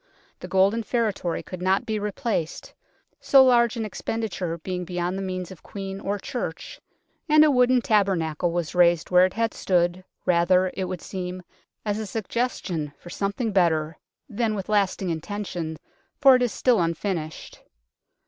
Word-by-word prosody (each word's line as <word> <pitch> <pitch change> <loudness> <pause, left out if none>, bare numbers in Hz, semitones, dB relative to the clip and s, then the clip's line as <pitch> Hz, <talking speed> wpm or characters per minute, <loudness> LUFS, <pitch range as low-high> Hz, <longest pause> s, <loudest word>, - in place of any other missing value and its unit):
The - - -8
golden 195 +4 +3
feretory 215 -7 -1
could 185 -1 -8
not 190 +2 +1
be 215 -1 -2
replaced, 205 -4 -3 0.5
so 270 -1 +6
large 235 -2 +4
an 225 - -2
expenditure 205 -5 -3
being 180 +2 -4
beyond 175 +1 -2
the 195 - -3
means 185 -1 -4
of 185 - -12
Queen 195 -1 -7
or 200 +1 -2
Church, 195 -5 -6 0.5
and 305 0 +7
a 300 - +4
wooden 250 -1 +4
tabernacle 175 -6 +1
was 170 -2 -2
raised 175 -1 +3
where 180 +1 +6
it 185 - -11
had 230 0 0
stood, 180 0 0 0.2
rather, 180 +1 +3
it 190 - -3
would 180 -1 -6
seem, 185 -1 -5 0.4
as 210 0 -1
a 215 - -4
suggestion 195 - -3
for 175 - -12
something 200 +5 -2
better 165 -4 +2 0.3
than 220 -1 -1
with 195 0 -5
lasting 195 -3 +1
intention, 165 -2 -4 0.4
for 270 -2 +7
it 250 - +1
is 245 -2 +1
still 240 -7 +2
unfinished. 165 -1 -3
190 Hz, 160 wpm, -25 LUFS, 175-220 Hz, 0.5 s, and